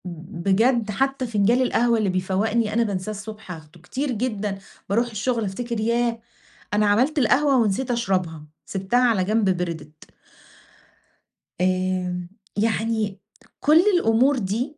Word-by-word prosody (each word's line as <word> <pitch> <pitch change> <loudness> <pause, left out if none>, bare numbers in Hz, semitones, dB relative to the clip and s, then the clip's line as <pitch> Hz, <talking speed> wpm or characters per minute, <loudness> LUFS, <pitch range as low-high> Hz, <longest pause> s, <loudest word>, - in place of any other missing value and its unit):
ب - - -4
ب 170 0 -9
بجد 225 +2 +3
حتّى 270 +3 -1
فِنجان 225 +3 +2
القهوة 240 -2 +2
اللي 210 -3 +1
بيفوَّقني 205 +4 0
أنا 235 +1 +3
بانساه 200 -1 -3
الصبح 210 -1 -8
آخده. 160 0 -11
كتير 260 - -3
جدًا 210 -4 -2 0.3
باروح 230 +4 +2
الشغل 225 +1 -1
أفتكر 235 +4 -4
ياه! 235 +1 0 0.5
أنا 210 0 +3
عملت 255 +10 +2
القهوة 275 +3 +3
ونسيت 235 +2 +1
أشرَبها، 185 -9 -1 0.2
سِبتها 195 +5 0
على 205 -5 +2
جنب 210 +1 +1
بردِت. 160 -3 -6 1.5
آمم، 185 -1 -1 0.3
يعني 220 -2 0 0.4
كل 305 +2 +5 0.2
الأمُور 260 0 +3
دي 240 +8 -3
215 Hz, 130 wpm, -23 LUFS, 185-240 Hz, 1.5 s, كل